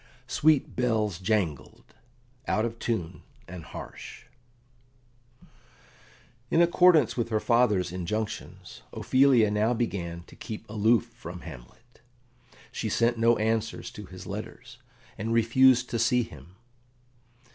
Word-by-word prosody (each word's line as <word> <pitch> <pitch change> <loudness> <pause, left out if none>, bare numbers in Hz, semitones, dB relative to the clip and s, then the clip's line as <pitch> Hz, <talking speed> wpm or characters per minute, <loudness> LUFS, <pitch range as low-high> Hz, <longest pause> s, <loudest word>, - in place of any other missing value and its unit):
"Sweet 145 +3 +2
Bells 110 -7 0
jangled, 90 -9 -2 0.5
out 110 +1 +1
of 115 0 -5
Tune 90 -7 -3 0.3
and 90 -1 -9
Harsh" - - -10 2.3
In - - +2
accordance 170 -4 +5
with 120 -2 -2
her 110 -2 +1
father's 115 -7 +2
injunctions, 95 +5 -5
Ophelia 130 -5 +3
now 110 +3 +1
began 85 -7 -3
to - - -17
keep 110 0 -8
aloof 110 +2 +2
from 90 -6 -9
Hamlet; 115 - -13 0.7
she 110 - -3
sent 115 +2 +1
no 115 +1 +4
answers 110 0 -2
to - - -10
his - - -11
letters, - - -8 0.4
and 110 +3 -2
refused 125 +2 +4
to 115 - -1
see 120 +2 +3
him. 80 -2 -13
110 Hz, 115 wpm, -27 LUFS, 100-120 Hz, 2.3 s, accordance